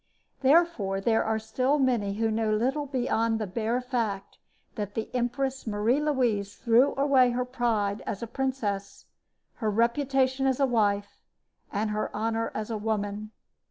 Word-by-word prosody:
Therefore 270 - +3
there 225 +3 +2
are 220 0 0
still 255 +6 0
many 235 -8 +1
who 225 +1 0
know 220 0 0
little 265 +7 0
beyond 230 -4 0
the 220 - -2
bare 225 +5 -1
fact 225 -6 -3 0.3
that 205 -1 -5
the 225 - -4
Empress 255 +1 -2
Marie 220 +6 +1
Louise 240 -9 0
threw 245 +4 +3
away 275 -2 +4
her 245 +1 -1
pride 225 -5 -1
as 200 - -3
a - - -1
princess, 230 -6 -3 0.5
her 220 - -1
reputation 260 +4 +1
as 265 0 +1
a 275 - +4
wife, 205 -5 0 0.5
and 210 +1 -1
her 210 0 -1
honor 225 +1 -1
as 215 +1 -3
a 220 - -1
woman. 210 -1 -2
230 Hz, 155 wpm, -27 LUFS, 210-260 Hz, 0.5 s, away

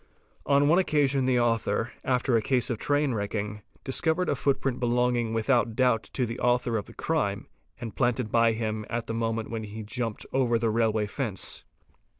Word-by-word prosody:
On 140 0 +4
one 170 +5 +5
occasion 140 -6 +2
the 130 -1 +3
author, 115 0 0
after 125 -1 +1
a 115 - +3
case 125 +2 +1
of 115 - -3
train 145 -2 +1
wrecking, 105 0 -3 0.2
discovered 160 +6 +1
a - - +2
footprint 135 -2 0
belonging 120 -1 +1
without 115 0 +1
doubt 125 -3 +2
_ - - -38
to 130 - 0
the 115 +1 -5
author 125 -1 +1
of 105 -2 -1
the - - -13
crime - - -1 0.3
and 115 -3 -6
planted 120 -3 0
by 115 -1 +4
him 110 -1 -2
at 115 -1 -2
the 115 - -4
moment 115 0 -2
when 115 -1 -3
he 105 0 -8
had 110 -2 -7
jumped 115 -2 -4
over 125 -3 +2
the 115 -1 0
railway 110 -1 +1
fence. 105 -2 -4
120 Hz, 190 wpm, -27 LUFS, 110-130 Hz, 0.3 s, one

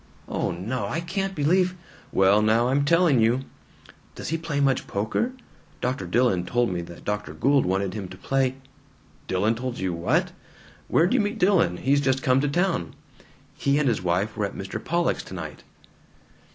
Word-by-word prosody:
"Oh - - -1
no. 100 +5 -3
I 160 - -2
can't 190 +3 -3
believe 180 +5 +2 0.2
" - - -25
"Well 100 +2 +5
now, 115 +3 +3
I'm 140 +2 +2
telling 165 -4 +4
you!" 115 +3 +3 0.7
"Does - - -6
he 165 - 0
play 155 -3 -2
much 135 -2 +1
poker? 110 - -1 0.5
Dr. 125 -7 -2
Dillon 95 -2 +2
told 120 +3 0
me 90 -1 -2
that 85 0 -11
Dr. 105 0 -3
Gould 140 -4 +3
wanted 95 0 0
him 100 -3 -5
to 90 +1 -11
play 135 +2 0 0.4
" - - -31
"Dillon 100 +4 +1
told 125 +1 -4
you 95 -2 -2
what? 85 0 +1 0.6
Where'd 170 +6 +3
you 260 - +3
meet 210 +2 -2
Dillon? 180 - +3
He's 140 +6 +2
just 130 -1 +1
come 130 +1 +3
to 145 - 0
town." 170 - 0 0.6
"He 140 0 +1
and 150 -2 +2
his 115 -6 +1
wife 90 +4 0
were 105 - 0
at - - -11
Mr. 95 0 -5
Pollock's 170 0 0
tonight." 80 -5 -8
125 Hz, 180 wpm, -25 LUFS, 95-150 Hz, 0.7 s, Well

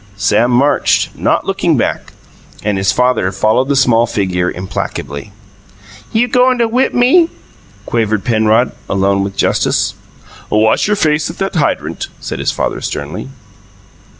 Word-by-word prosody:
Sam 105 +4 +2
marched, 130 +4 +2
not - - 0
looking - - +1
back, - - -2 0.5
and 105 -2 0
his 95 +1 +2
father 125 -5 +1
followed 110 +6 +1
the 140 - +2
small 120 -3 +3
figure 90 -4 -1
implacably. 90 -2 -5 0.8
"You 235 +3 +2
goin' 250 +1 +3
to 235 -1 +2
whip 250 +4 0
me?" 310 +8 +4 0.6
quavered 110 -3 -1
Penrod, 110 +1 +2 0.2
alone 95 0 +1
with 100 0 -5
Justice. - - +1 0.6
"Wash 110 - +2
your 210 - +2
face 155 -3 +1
at 165 - -8
that 195 0 -2
hydrant," 155 -5 -1
said - - -5
his - - 0
father - - -3
sternly. 75 - -5
115 Hz, 140 wpm, -15 LUFS, 100-155 Hz, 0.8 s, me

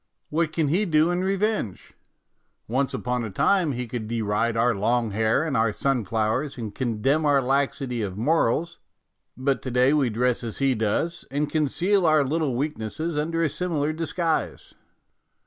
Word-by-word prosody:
What 160 +1 +1
can 160 -2 0
he 190 +8 +2
do 160 -1 +3
in 175 +1 -1
revenge? 195 - -1 0.7
Once 130 +4 0
upon 125 -1 -2
a 110 - -4
time 160 - +2
he 125 0 -3
could 115 -2 -5
deride 115 0 0
our 120 +1 +3
long 115 +2 0
hair 110 +6 +1
and 160 -4 -2
our 110 -1 +2
sunflowers 115 +2 -1
and 110 -4 -5
condemn 130 +6 0
our 145 -2 +4
laxity 135 -2 -1
of 95 -2 -4
morals, 160 +5 +1 0.6
but 135 +1 0
to 130 - -5
day 125 +3 +3
we 140 -5 +2
dress 125 +2 0
as 115 -2 -4
he 135 -1 +2
does, 120 +10 -1
and 145 +2 -1
conceal 175 +5 +1
our 155 -2 +4
little 150 -2 0
weaknesses 150 +3 -3
under 165 +3 0
a - - +3
similar 155 -1 -1
disguise. 165 0 -2
135 Hz, 165 wpm, -25 LUFS, 115-160 Hz, 0.7 s, our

